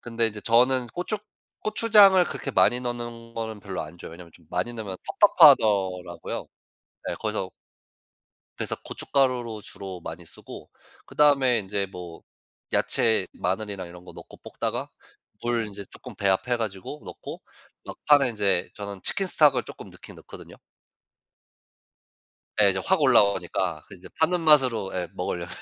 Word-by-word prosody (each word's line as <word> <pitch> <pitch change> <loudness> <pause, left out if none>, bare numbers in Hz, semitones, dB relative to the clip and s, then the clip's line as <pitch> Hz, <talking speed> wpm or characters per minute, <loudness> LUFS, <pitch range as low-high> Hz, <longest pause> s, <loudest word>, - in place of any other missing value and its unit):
근데 115 -1 -1
이제 105 -1 -5
저는 125 +3 +3
고추 180 - -3 0.5
고추장을 210 -3 +6
그렇게 140 - -5
많이 110 +3 +3
넣는 120 -1 -6
거는 110 -2 -5
별로 95 -2 -5
안 80 +2 -11
좋아해요. - - -9
왜냐하면 85 0 -13
좀 85 - -20
많이 100 +7 -2
넣으면 105 -5 -6 0.2
텁텁하더라고요. 90 -5 +4 0.6
네 - - -2
그래서 - - -3 1.1
그래서 - - -3
고춧가루로 125 -5 -1
주로 95 -2 -8
많이 80 +1 -8
쓰고. - - -11 0.4
그다음에 135 -5 +3
인제 100 0 -3
뭐 90 -3 -9 0.5
야채 110 -5 +2
마늘이나 95 0 -3
이런 90 +1 -13
거 - - -11
넣고 - - -13
볶다가 - - -4 0.5
물 120 -1 0
인제 100 -1 -9
쪼끔 - - -12
배합해 100 +5 +1
가지고 110 +5 -5
넣고 - - -9 0.4
막판에 145 -3 +3
인제 100 -5 0
저는 100 -2 -7
치킨 195 - +1
스톡을 145 -8 +4
쪼끔 - - -11
넣긴 - - -13
넣거든요. - - -13 2.1
예. 100 - +6
이제 95 - -2
확 190 -4 +2
올라오니까 95 - +2
그 - - -12
이제 90 - -13
파는 170 +2 +2
맛으로 130 -10 +3
예 90 -1 -3
먹으려면 90 -1 -4
110 Hz, 325 characters per minute, -25 LUFS, 95-125 Hz, 2.1 s, 고추장을